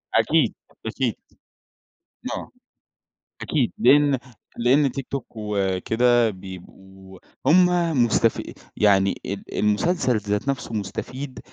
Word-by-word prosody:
أكيد، -, -, +3 dB, 0.3 s
أكيد. -, -, -1 dB, 1.2 s
آه. -, -, -8 dB, 0.9 s
أكيد، 135 Hz, -7 st, 0 dB
لأن 140 Hz, +1 st, +5 dB, 0.4 s
لأن 130 Hz, +3 st, +3 dB
تيك 135 Hz, 0 st, -5 dB
توك 140 Hz, -2 st, -4 dB
وكده 110 Hz, +3 st, +1 dB
بيبقوا 95 Hz, 0 st, -12 dB, 0.3 s
هُم 180 Hz, +3 st, +6 dB, 0.4 s
مستفي 115 Hz, 0 st, 0 dB, 0.2 s
يعني 100 Hz, -2 st, +3 dB
ال 100 Hz, 0 st, -4 dB, 0.2 s
المسلسل 125 Hz, -, +1 dB
ذات 105 Hz, +4 st, -2 dB
نفسه 125 Hz, -4 st, -3 dB
مستفيد 130 Hz, +6 st, -5 dB
115 Hz, 95 wpm, -23 LUFS, 100-135 Hz, 1.2 s, هُم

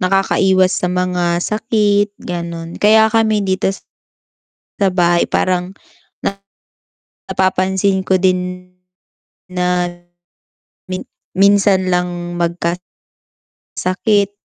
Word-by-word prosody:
Nakakaiwas 190 Hz, 0 st, +2 dB
sa 180 Hz, -, 0 dB
mga 180 Hz, -1 st, 0 dB
sakit 210 Hz, -2 st, +1 dB
ganun, 170 Hz, -1 st, -6 dB
kaya 220 Hz, +1 st, +5 dB
kami 220 Hz, -2 st, +2 dB
dito 190 Hz, 0 st, 0 dB, 1.1 s
sa 195 Hz, -2 st, +1 dB
bahay 175 Hz, -1 st, +3 dB
parang, 180 Hz, 0 st, 0 dB, 1.6 s
napapansin 190 Hz, +1 st, +1 dB
ko 190 Hz, 0 st, +1 dB
din 180 Hz, 0 st, -1 dB, 0.8 s
na 180 Hz, -1 st, 0 dB, 1.0 s
min 185 Hz, 0 st, -4 dB, 0.3 s
minsan 195 Hz, -1 st, +4 dB
lang 175 Hz, -1 st, -2 dB
magka 170 Hz, 0 st, -1 dB, 1.0 s
sakit. 200 Hz, +2 st, +1 dB
185 Hz, 85 wpm, -17 LUFS, 180-200 Hz, 1.6 s, kaya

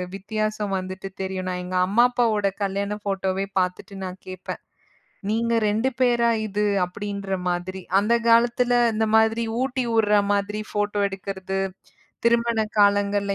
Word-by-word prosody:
வித்தியாசம் 215 Hz, 0 st, -2 dB
வந்துட்டு 185 Hz, +1 st, -6 dB
தெரியும். 190 Hz, -1 st, -3 dB
நான் 180 Hz, 0 st, -3 dB
எங்க 185 Hz, +1 st, -5 dB
அம்மா, 215 Hz, +5 st, +4 dB
அப்பாவோட 220 Hz, -5 st, +2 dB, 0.2 s
கல்யாண 200 Hz, +1 st, -1 dB
ஃபோட்டோவே 195 Hz, -1 st, -1 dB
பாத்துட்டு 180 Hz, +2 st, -3 dB
நான் 185 Hz, 0 st, -6 dB
கேட்பேன். 185 Hz, 0 st, -7 dB, 0.7 s
"நீங்க 230 Hz, +2 st, +1 dB, 0.2 s
2 220 Hz, +5 st, +1 dB
பேரா 240 Hz, -2 st, +3 dB, 0.2 s
இது?" 210 Hz, +1 st, -1 dB, 0.2 s
அப்டின்ற 200 Hz, +1 st, -4 dB
மாதிரி. 180 Hz, +2 st, -3 dB, 0.2 s
அந்தக் 230 Hz, +3 st, +1 dB
காலத்துல 240 Hz, +1 st, +4 dB, 0.2 s
இந்த 220 Hz, +1 st, +1 dB
மாதிரி 225 Hz, +1 st, +3 dB, 0.2 s
ஊட்டிவுடுற 235 Hz, -5 st, +2 dB, 0.2 s
மாதிரி 205 Hz, +1 st, -1 dB
ஃபோட்டோ 205 Hz, 0 st, -1 dB
எடுக்கறது, 195 Hz, 0 st, -4 dB, 0.7 s
திருமண 235 Hz, -1 st, +3 dB, 0.2 s
காலங்கள்ல 200 Hz, 0 st, +3 dB
205 Hz, 125 wpm, -24 LUFS, 190-225 Hz, 0.7 s, அம்மா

